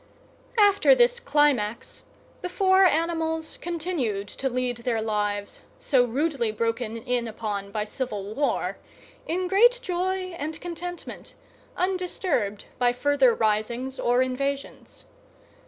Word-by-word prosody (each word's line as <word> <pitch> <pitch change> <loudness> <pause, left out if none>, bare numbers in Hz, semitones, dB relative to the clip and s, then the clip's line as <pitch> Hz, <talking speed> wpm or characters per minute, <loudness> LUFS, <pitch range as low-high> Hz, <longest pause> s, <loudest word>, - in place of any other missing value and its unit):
After 410 +3 +6
this - - +3
climax, 280 - 0 0.4
the 360 - -3
four 380 0 +4
animals 320 -1 0
continued 310 - -2
to 265 - -3
lead 250 -1 -1
their 235 -1 -1
lives, 205 -2 -2 0.2
so 255 -4 +3
rudely 260 -2 0
broken 230 +1 -2
in 245 0 -1
upon 210 -3 -4
by 210 +1 -2
civil 210 -4 -4
war, 285 +4 -1 0.5
in 360 +2 -1
great 475 +7 +5
joy 370 -1 -2
and 310 +2 -4
contentment, 350 0 -7 0.4
undisturbed 360 - -1
by 245 -1 +3
further 290 - +3
risings 235 - -1
or 245 +1 +3
invasions. 275 +2 -4
275 Hz, 115 wpm, -26 LUFS, 230-355 Hz, 0.5 s, After